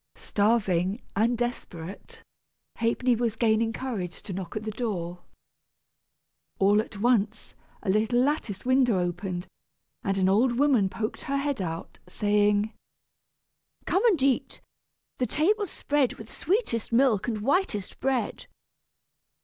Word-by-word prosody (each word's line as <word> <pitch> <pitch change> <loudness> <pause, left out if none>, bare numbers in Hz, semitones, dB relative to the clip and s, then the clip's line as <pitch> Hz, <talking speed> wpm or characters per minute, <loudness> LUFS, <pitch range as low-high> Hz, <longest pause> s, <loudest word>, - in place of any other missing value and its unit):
Starving 200 -2 +1 0.2
and 230 +4 +2
desperate, 195 -7 -5 0.5
Ha'penny 235 +2 +2
was 230 -1 0
gaining 225 0 +2
courage 220 -8 -5
to 195 - -6
knock 185 -2 -6
at 215 - -3
the 215 - -3
door. 180 -7 -3 1.4
All 205 +2 +4
at 220 -2 -10
once 220 -1 +1 0.3
a 205 - -2
little 220 +4 +2
lattice 250 -7 0
window 255 -4 +4
opened, 175 +1 -3 0.6
and 195 -2 0
an 190 -1 +3
old 230 +6 +3
woman 260 -9 +4
poked 215 +3 -4
her 275 +1 0
head 280 -5 -1
out 165 -2 -5
saying: 205 +2 +2 1.1
"Come 385 - +1
and 350 - +3
eat, 270 -2 +1 0.6
the 250 - +1
table's 395 - +1
spread 285 -4 0
With 220 0 -11
sweetest 355 - -1
milk 235 -4 +3
and 220 -3 -2
whitest 250 - 0
bread. 265 -1 -1
220 Hz, 125 wpm, -27 LUFS, 195-255 Hz, 1.4 s, All